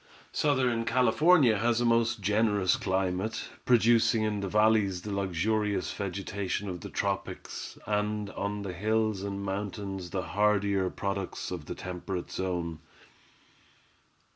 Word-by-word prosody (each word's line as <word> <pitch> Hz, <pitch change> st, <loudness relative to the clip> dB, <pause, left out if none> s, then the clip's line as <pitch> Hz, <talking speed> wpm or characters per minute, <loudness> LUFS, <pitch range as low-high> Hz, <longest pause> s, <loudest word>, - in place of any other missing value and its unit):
Southern 130 Hz, -5 st, +1 dB
California 130 Hz, -, +4 dB
has 120 Hz, +1 st, +2 dB
a 120 Hz, -, +1 dB
most 115 Hz, -1 st, +2 dB
generous 105 Hz, -2 st, +2 dB
climate, 95 Hz, +3 st, -1 dB, 0.2 s
producing 115 Hz, -2 st, +4 dB
in 105 Hz, -1 st, 0 dB
the 100 Hz, -, -2 dB
valleys 105 Hz, -3 st, +3 dB
the 105 Hz, -, -4 dB
luxurious 100 Hz, +1 st, 0 dB
vegetation 100 Hz, +1 st, -3 dB
of 90 Hz, -3 st, -5 dB
the -, -, -7 dB
tropics, 100 Hz, -1 st, -4 dB
and 105 Hz, 0 st, -1 dB
on 100 Hz, 0 st, -3 dB
the 95 Hz, -2 st, -4 dB
hills 110 Hz, +1 st, 0 dB
and 100 Hz, 0 st, -4 dB
mountains 95 Hz, -2 st, -4 dB
the 95 Hz, +1 st, -2 dB
hardier 100 Hz, -2 st, +2 dB
products 100 Hz, -1 st, -4 dB
of -, -, -5 dB
the -, -, -5 dB
temperate 90 Hz, 0 st, -5 dB
zone. 85 Hz, -4 st, -3 dB
100 Hz, 125 wpm, -29 LUFS, 95-110 Hz, 0.2 s, California